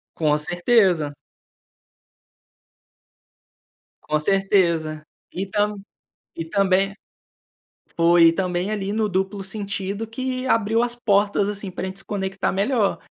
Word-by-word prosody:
Com 150 Hz, -2 st, +2 dB
certeza. 175 Hz, -2 st, +2 dB, 2.9 s
Com 155 Hz, 0 st, 0 dB
certeza, 170 Hz, -4 st, +1 dB, 0.3 s
e 190 Hz, +2 st, -3 dB
tam 210 Hz, 0 st, 0 dB, 0.6 s
e 165 Hz, -, -4 dB
também 195 Hz, +1 st, +2 dB, 1.1 s
Foi, 170 Hz, 0 st, +6 dB
e -, -, +6 dB
também 180 Hz, +1 st, -1 dB
ali 205 Hz, -1 st, -2 dB
no 215 Hz, -1 st, 0 dB
duplo 190 Hz, +1 st, -2 dB
sentido 200 Hz, +1 st, -4 dB
que 255 Hz, +3 st, -4 dB
abriu 225 Hz, -1 st, +2 dB
as 240 Hz, 0 st, -1 dB
portas 205 Hz, -3 st, +1 dB
assim 200 Hz, -2 st, -5 dB
para 185 Hz, +1 st, -4 dB
gente 190 Hz, -, -7 dB
se 195 Hz, -, -7 dB
conectar 195 Hz, -1 st, -2 dB
melhor. 205 Hz, +1 st, +1 dB
195 Hz, 115 wpm, -22 LUFS, 180-210 Hz, 2.9 s, Foi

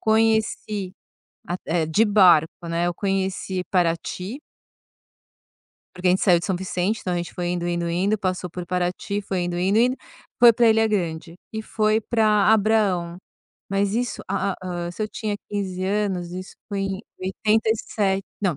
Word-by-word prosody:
conheci 220 Hz, -3 st, +1 dB, 0.6 s
a 175 Hz, -, -1 dB
eh, 165 Hz, -1 st, +1 dB
de 210 Hz, +8 st, +3 dB
barco, 175 Hz, -4 st, +4 dB
né, 170 Hz, +1 st, 0 dB
eu 175 Hz, -, -1 dB
conheci 190 Hz, -1 st, -2 dB
Parati 180 Hz, -, -1 dB, 1.6 s
porque 180 Hz, 0 st, 0 dB
a -, -, +6 dB
gente 185 Hz, -, +2 dB
saiu 180 Hz, -4 st, +5 dB
de 170 Hz, -, -5 dB
São 190 Hz, -3 st, 0 dB
Vicente, 190 Hz, +3 st, -1 dB
então 180 Hz, -, -3 dB
a -, -, 0 dB
gente 175 Hz, 0 st, -4 dB
foi 175 Hz, -1 st, -2 dB
indo, 175 Hz, -1 st, -2 dB
indo, 170 Hz, 0 st, -1 dB
indo, 195 Hz, +5 st, +1 dB
passou 185 Hz, -2 st, -2 dB
por 175 Hz, +1 st, -6 dB
Paraty, 180 Hz, +3 st, -2 dB
foi 190 Hz, -2 st, -2 dB
indo, 175 Hz, 0 st, -2 dB
indo, 195 Hz, +4 st, +2 dB
indo, 250 Hz, +2 st, +3 dB, 0.4 s
foi 240 Hz, -1 st, +8 dB
pra 235 Hz, +1 st, +4 dB
Ilha 220 Hz, 0 st, +4 dB
Grande 170 Hz, -5 st, -2 dB, 0.2 s
e 220 Hz, 0 st, -4 dB
foi 215 Hz, 0 st, +1 dB
pra 215 Hz, -2 st, +3 dB
Abraão. 200 Hz, -5 st, +2 dB, 0.5 s
Mas 200 Hz, +1 st, 0 dB
isso, 245 Hz, +1 st, -2 dB
ah, 195 Hz, -, 0 dB
hã, 175 Hz, -1 st, -4 dB
se 215 Hz, -, -5 dB
eu 210 Hz, -, -2 dB
tinha 210 Hz, -2 st, -3 dB
15 190 Hz, -2 st, -3 dB
anos, 190 Hz, -3 st, -1 dB
isso 185 Hz, +1 st, -7 dB
foi 200 Hz, -1 st, -2 dB
em 195 Hz, +1 st, -3 dB, 0.2 s
87, 210 Hz, 0 st, 0 dB, 0.2 s
não, 180 Hz, -7 st, 0 dB
190 Hz, 170 wpm, -23 LUFS, 175-215 Hz, 1.6 s, foi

